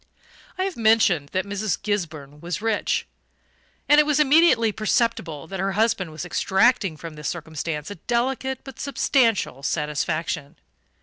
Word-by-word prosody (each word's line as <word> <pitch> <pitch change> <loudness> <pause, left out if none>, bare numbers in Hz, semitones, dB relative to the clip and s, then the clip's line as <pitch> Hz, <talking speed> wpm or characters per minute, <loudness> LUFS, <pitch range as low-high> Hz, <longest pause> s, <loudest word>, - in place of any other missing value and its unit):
I 370 - 0
have 385 -1 -3
mentioned 220 -10 +3
that 185 +4 -1
Mrs. 200 0 -2
Gisburn 155 -8 -4
was 175 +4 -4
rich; 220 -1 0 0.8
and 295 +1 +6
it - - +7
was 300 -1 +2
immediately 295 -6 +5
perceptible 215 - -1
that 190 +3 -7
her 195 +1 -1
husband 210 -4 +1
was 155 +2 -7
extracting 190 -1 +2
from 165 +1 -8
this 150 0 -4
circumstance 160 0 -5
a - - -6
delicate 260 +2 0
but 270 -3 -11
substantial 240 - +1
satisfaction. 150 +1 -2
195 Hz, 140 wpm, -23 LUFS, 160-235 Hz, 0.8 s, it